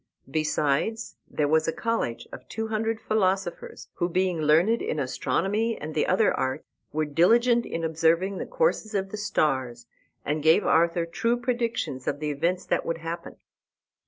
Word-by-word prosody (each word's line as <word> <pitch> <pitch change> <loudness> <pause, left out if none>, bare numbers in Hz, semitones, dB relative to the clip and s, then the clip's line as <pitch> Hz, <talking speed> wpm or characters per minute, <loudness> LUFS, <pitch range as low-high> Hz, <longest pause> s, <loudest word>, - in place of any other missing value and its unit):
Besides, 155 +7 0
there 150 - 0
was 160 +2 +2
a - - +2
college 230 - -2
of - - -11
two 220 0 -4
hundred 225 0 -1
philosophers, 215 - -1
who, 175 -1 0
being 180 -2 0
learned 165 +10 +3
in 155 - -2
astronomy 205 - 0
and 155 +1 -6
the 155 - +1
other 195 +4 +3
arts, 130 +3 -2 0.3
were 155 +1 0
diligent 235 - +3
in 165 - -4
observing 165 +4 +1
the - - -4
courses 485 - 0
of 195 -1 -1
the 210 - -4
stars, 130 - -1 0.4
and 150 +1 -1
gave 160 +6 +4
Arthur 170 +1 +3
true 230 +8 0
predictions 235 - -2
of - - -1
the 150 -1 -2
events 170 +6 -1
that - - 0
would 165 - -2
happen. 165 +1 -6
170 Hz, 160 wpm, -26 LUFS, 155-220 Hz, 0.4 s, gave